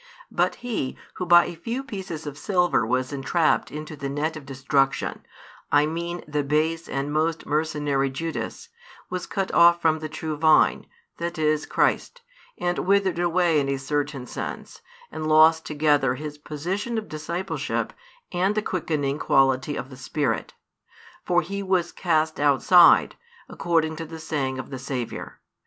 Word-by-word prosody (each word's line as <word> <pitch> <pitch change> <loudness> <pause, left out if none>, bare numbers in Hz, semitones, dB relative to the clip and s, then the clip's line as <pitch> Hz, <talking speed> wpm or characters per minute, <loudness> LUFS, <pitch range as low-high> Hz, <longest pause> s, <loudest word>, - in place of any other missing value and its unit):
But - - +1
he, 215 - -3 0.2
who 180 - -3
by 175 0 +7
a - - -5
few 230 +10 -4
pieces 190 - -6
of 145 -1 -6
silver 180 - +1
was 130 +3 -1
entrapped 150 +4 +1
into 155 +1 -7
the 140 -1 -5
net 150 +3 -2
of 145 -3 -9
destruction, 135 0 0 0.5
I 145 0 +5
mean 170 +2 -4
the 150 -1 -1
base 155 +3 0
and 140 +2 -2
most 160 +1 0
mercenary 145 -3 0
Judas, 165 - -5 0.4
was 180 -1 -3
cut 195 -1 -2
off 170 0 +6
from 160 -2 +2
the 155 0 -5
true 155 0 -4
Vine, 155 0 +4 0.3
that 170 0 -4
is 155 -1 +1
Christ, - - 0 0.4
and 175 0 -1
withered 195 -2 +2
away 175 -2 +2
in 140 -1 -1
a 140 - 0
certain 145 -1 -2
sense, - - -7 0.3
and 155 - -4
lost 160 +1 +5
together 145 -4 +2
his 150 +1 -7
position 185 +11 -3
of 220 - -4
discipleship 160 0 -3 0.4
and 185 +3 +1
the 215 - 0
quickening 150 -7 -2
quality 135 +1 +2
of 130 - -6
the 130 - -10
Spirit. 130 -3 -2 0.7
For 175 0 +3
he 200 +4 -4
was 185 -3 0
cast 160 -3 0
outside, 150 +5 +5 0.3
according 160 -3 0
to 165 - -5
the 165 +1 -8
saying 140 -5 -2
of 130 0 -7
the 130 - -5
Saviour. 125 -2 -5
155 Hz, 155 wpm, -24 LUFS, 145-175 Hz, 0.7 s, by